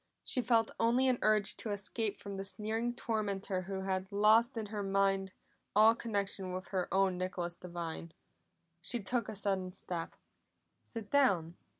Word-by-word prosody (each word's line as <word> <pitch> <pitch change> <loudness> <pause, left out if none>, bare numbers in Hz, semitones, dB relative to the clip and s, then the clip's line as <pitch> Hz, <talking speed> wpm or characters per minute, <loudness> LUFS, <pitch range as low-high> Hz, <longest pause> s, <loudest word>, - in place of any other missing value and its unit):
She 255 - 0
felt 230 -2 +3
only 240 +3 +3
an 255 -2 +2
urge 215 -1 +3
to 225 - -2
escape 205 +1 -1
from 200 -1 -6
the 195 - -3
sneering 220 +4 -2
tormentor 200 -5 -1
who 195 -1 -3
had 190 0 -2
lost 220 +4 +4
in 220 - -2
her 210 0 -4
mind 195 -1 +1 0.4
all 215 +2 +7
connection 200 -5 -3
with 185 +1 -5
her 185 -2 -2
own 190 -2 +2
Nicholas 180 -2 -3
Devine. 170 -2 -6 0.7
She 240 +7 -2
took 230 +2 0
a 220 - -5
sudden 190 -2 -1
step. 170 -2 -5 0.7
"Sit 225 -3 -7
down!" 185 - +3
200 Hz, 160 wpm, -33 LUFS, 190-225 Hz, 0.7 s, all